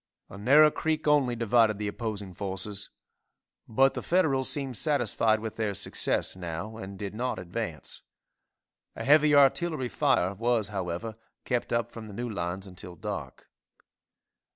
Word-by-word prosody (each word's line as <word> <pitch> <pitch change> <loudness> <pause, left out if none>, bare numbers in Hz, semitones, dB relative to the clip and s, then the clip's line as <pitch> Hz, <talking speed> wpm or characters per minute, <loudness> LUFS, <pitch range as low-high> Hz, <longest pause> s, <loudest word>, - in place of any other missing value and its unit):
A 100 - -9
narrow 150 +8 +6
creek 155 0 -1
only 140 -5 +3
divided 115 -2 +3
the 105 0 -3
opposing 105 -3 -4
forces, 100 +2 -4 0.8
but 135 +4 +3
the - - -4
Federals 145 -8 +1
seemed 135 -3 -3
satisfied 115 -6 +2
with 110 0 -6
their 105 -3 -1
success - - -1
now 95 +4 -5
and 95 -2 -8
did 100 0 -5
not 125 +4 -2
advance. 90 -2 -5 0.9
A - - -5
heavy 150 +1 +5
artillery 145 -1 +3
fire 130 -12 +2
was, 115 0 0
however, 100 +3 -4 0.3
kept 125 -1 -1
up 120 0 0
from 115 -2 -9
the 100 - -10
new 120 +2 -3
lines 95 -2 -4
until 90 -2 -10
dark. - - -6
110 Hz, 145 wpm, -28 LUFS, 100-130 Hz, 0.9 s, narrow